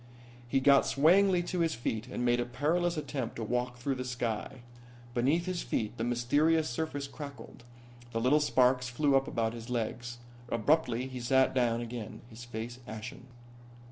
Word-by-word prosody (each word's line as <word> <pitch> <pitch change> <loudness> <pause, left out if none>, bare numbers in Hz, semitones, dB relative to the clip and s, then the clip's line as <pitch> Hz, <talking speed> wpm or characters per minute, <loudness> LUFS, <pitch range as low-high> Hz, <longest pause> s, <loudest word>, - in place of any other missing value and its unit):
He 135 +3 +2
got 140 0 +5
swayingly 180 +5 +4
to 180 +1 -3
his 165 -2 +1
feet 115 0 -3
and 125 - -3
made 120 0 +3
a 120 - 0
perilous 165 +7 0
attempt 135 -5 -3
to 115 - -4
walk 125 +2 -1
through 135 +3 -1
the 130 -1 -4
sky. 125 +1 -3 0.5
Beneath 140 +8 +2
his 185 -2 -2
feet 110 -1 -2
the 115 - -2
mysterious 145 +7 +2
surface 145 +2 -3
crackled, 140 -3 -9 0.5
and 115 -1 -2
little 145 +4 +5
sparks 125 -3 +3
flew 140 +2 +2
up 135 0 +3
about 115 -1 -1
his 115 0 -8
legs. 120 0 -3 0.3
Abruptly 125 0 +2
he 130 -1 -6
sat 130 +2 +3
down 120 -2 +1
again, 120 -2 -6
his 115 +2 -10
face 120 +1 -6
ashen. 115 +4 -8
125 Hz, 170 wpm, -31 LUFS, 120-145 Hz, 0.5 s, got